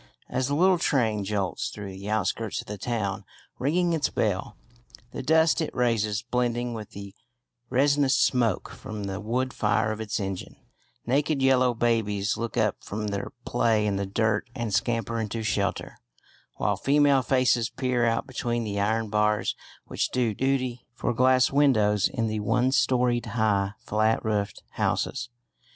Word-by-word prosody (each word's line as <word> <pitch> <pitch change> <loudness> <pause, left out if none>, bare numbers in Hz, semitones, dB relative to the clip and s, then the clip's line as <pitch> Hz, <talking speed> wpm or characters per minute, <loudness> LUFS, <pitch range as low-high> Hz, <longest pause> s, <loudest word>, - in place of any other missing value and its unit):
As 130 0 -1
the 140 - 0
little 185 +2 +4
train 115 -10 +1
jolts 100 -2 -2
through 100 -2 -7
the 95 +2 -7
outskirts 110 +1 -1
of - - -6
the 105 -1 -7
town, 105 -2 -2 0.4
ringing 170 +6 +1
its 160 -3 +1
bell, 105 0 -1 0.5
the - - -5
dust 160 +5 +3
it 160 - -1
raises 110 -4 +1
blending 120 -1 -1
with 110 -2 -7
the 100 -1 -8 0.6
resinous 140 0 +3
smoke 120 -6 +1
from 105 -1 -7
the 95 0 -4
wood 125 +4 -1
fire 110 +1 +1
of 110 0 -4
its 110 0 -2
engine, 95 -2 -5 0.5
naked 140 +4 +1
yellow 130 -2 +4
babies 110 -4 +1
look 115 0 -4
up - - +2
from 105 +1 -4
their 100 +4 -4
play 115 -3 +2
in 100 -2 0
the 100 0 -2
dirt 110 +3 0
and 115 -5 -3
scamper 115 0 0
into 110 +1 -3
shelter, 100 -2 -2 0.6
while 105 - 0
female 140 +3 +4
faces 125 -2 +2
peer 125 -2 -1
out 115 +1 +1
between 120 -3 -2
the 100 -2 -3
iron 110 +2 +1
bars 105 0 +1 0.3
which - - -1
do 120 -4 0
duty 130 0 -1
for 120 - -1
glass 130 +1 +4
windows 110 -8 +3
in 115 -4 -2
the 110 -1 -2
one 120 +5 +1
storeyed 125 -3 +2
high 100 -3 +1
flat 110 +2 +1
roofed 105 -2 -2
houses. 120 -2 -1
115 Hz, 160 wpm, -26 LUFS, 105-130 Hz, 0.6 s, little